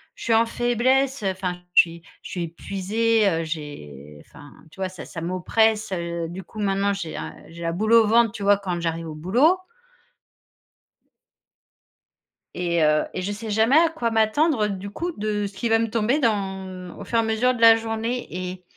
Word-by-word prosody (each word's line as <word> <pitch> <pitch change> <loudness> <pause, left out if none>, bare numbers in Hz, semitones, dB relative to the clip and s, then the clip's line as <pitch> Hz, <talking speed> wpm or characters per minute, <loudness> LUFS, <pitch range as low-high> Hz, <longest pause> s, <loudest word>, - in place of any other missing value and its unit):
je - - -10
suis 230 - +1
en 225 +1 +5
faiblesse, 250 +3 +1
heu, 190 - +1
enfin 180 -1 -4
je - - +9
suis 170 0 -8 0.2
je - - -10
suis 175 -2 -3
épuisée, 205 +6 0
heu, 165 -1 -1
j'ai 75 - -8
enfin 145 -2 -15 0.2
tu 190 - -18
vois 190 - -1
ça 185 -4 -9
ça 165 - -8
m'oppresse, 210 +5 +1
heu, 170 -2 -3
du 185 +2 -7
coup 215 +4 -9
maintenant 200 0 +1
j'ai 170 -5 -5
un - - -6
j'ai 170 +1 -11
la 165 0 -1
boule 215 +5 -1
au 230 -2 +6
ventre, 230 0 +4
tu 210 -3 -7
vois, 205 0 +5
quand 185 -3 -3
j'arrive 165 -1 -3
au 155 - -7
boulot. 245 - +3 3.0
Et 170 -2 0
heu 150 0 +3
et 185 - -3
je 200 +3 -3
sais 215 +2 -6
jamais 220 +7 +4
à 330 0 +5
quoi 280 -8 -2
m'attendre, 225 +2 +2
du 200 0 -5
coup, 345 - -4
de 210 0 -1
ce 200 - -12
qu'il 230 +4 -3
va 225 - +5
me 230 - 0
tomber 230 +6 +1
dans 190 - -2
au - - -8
fur 230 - -1
et - - +5
à - - -2
mesure 225 +3 +1
de 235 - -7
la 225 0 +9
journée 225 +2 -3
et 180 0 -6
200 Hz, 200 wpm, -23 LUFS, 175-225 Hz, 3.0 s, je